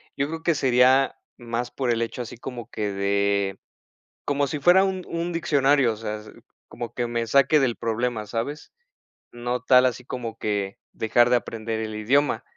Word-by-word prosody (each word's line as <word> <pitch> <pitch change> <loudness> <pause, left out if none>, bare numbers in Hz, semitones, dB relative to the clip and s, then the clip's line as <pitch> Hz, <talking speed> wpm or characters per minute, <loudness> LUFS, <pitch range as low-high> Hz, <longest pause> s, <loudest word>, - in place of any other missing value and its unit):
yo 140 0 0
creo 160 +1 -6
que 170 - +2
sería 130 0 +4 0.2
más 120 0 -4
por 130 -3 -2
el 115 -1 +1
hecho 115 +2 -3
así 120 -1 -8
como 120 -2 -8
que 105 -1 -3
de 100 0 0 0.7
como 145 0 +1
si 150 +1 -3
fuera 175 +6 +6
un 190 -1 -2
un 170 +1 -3
diccionario, 140 -6 +3
o - - -10
sea 110 -1 -4
s 105 - -13 0.4
como 120 -1 -7
que 120 - -2
me 115 -1 -2
saque 140 +5 +4
del 130 -4 +1
problema 115 -1 -2
¿sabes? 120 +8 -5 0.6
No 120 0 -3
tal 125 0 +5
así 125 0 -1
como 115 -3 -6
que 100 -2 -2 0.2
dejar 120 +2 +3
de 125 - +4
aprender 115 -1 -4
el 110 -1 -4
idioma. 125 +2 +1
120 Hz, 180 wpm, -24 LUFS, 110-140 Hz, 0.7 s, fuera